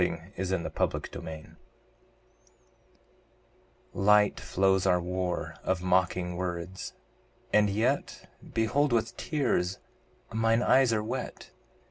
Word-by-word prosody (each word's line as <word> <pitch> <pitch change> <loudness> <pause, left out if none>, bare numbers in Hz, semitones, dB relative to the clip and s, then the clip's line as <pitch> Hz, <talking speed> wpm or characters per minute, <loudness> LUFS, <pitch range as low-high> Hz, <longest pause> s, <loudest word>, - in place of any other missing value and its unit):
Matthew 95 +1 -2
Arnold 85 - -3
The - - -1
Buried 80 -1 -8
Life - - -18 2.4
LIGHT 105 +1 +4
flows 95 0 +2
our 90 -1 +4
war 90 0 -2
of 95 -1 -1
mocking 90 -1 +1
words 90 +1 -4 0.6
and 105 -1 +5
yet 105 +3 -1 0.2
Behold, 120 +5 +1
with 115 -2 0
tears 95 - 0 0.6
mine 115 +1 +2
eyes 130 -2 +5
are 105 -1 +1
wet! 125 +4 -5
95 Hz, 105 wpm, -29 LUFS, 90-115 Hz, 2.4 s, and